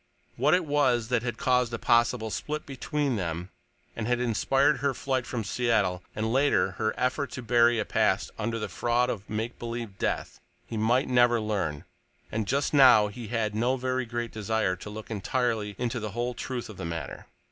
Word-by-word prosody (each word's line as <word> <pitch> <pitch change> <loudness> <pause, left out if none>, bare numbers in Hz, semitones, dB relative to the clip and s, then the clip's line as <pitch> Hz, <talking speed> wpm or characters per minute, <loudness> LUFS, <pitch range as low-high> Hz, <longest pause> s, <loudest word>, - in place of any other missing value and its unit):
What 145 +7 +4
it 180 -2 0
was 130 -6 +2
that 125 -3 +2
had 120 -2 -3
caused 125 -2 +2
a - - -3
possible 120 -1 +2
split 150 +9 -4
between 140 -1 -2
them 85 0 -4 0.4
and 110 -1 -3
had 120 0 +1
inspired 135 +5 +2
her 140 -2 0
flight 130 -1 -1
from 120 -3 -3
Seattle, 105 -5 +1
and, 110 +2 -1
later, 140 +2 +3
her 110 -1 +1
effort 130 +2 0
to 130 - -6
bury 120 0 +4
a 110 - 0
past - - +1
under 115 +1 -1
the 105 - -3
fraud 120 +1 +1
of 105 - -4
a - - -10
make 110 +3 -3
believe 115 -4 -5
death, - - -2 0.3
he 115 - -7
might 120 +5 +2
never 120 -2 +4
learn, 100 -9 -2 0.5
and 110 -1 -2
just 140 +3 0
now 125 -7 +7
he 115 +2 -8
had 110 -2 -1
no 120 +5 +1
very 130 0 -1
great 120 0 -3
desire 110 -3 0
to 95 - -9
look 110 +2 -8
entirely 110 -1 -1
into 120 0 -2
the 105 -2 -5
whole 120 +2 -2
truth 125 0 -5
of 110 - -11
the - - -6
matter. 80 -3 -6
120 Hz, 195 wpm, -27 LUFS, 110-125 Hz, 0.5 s, now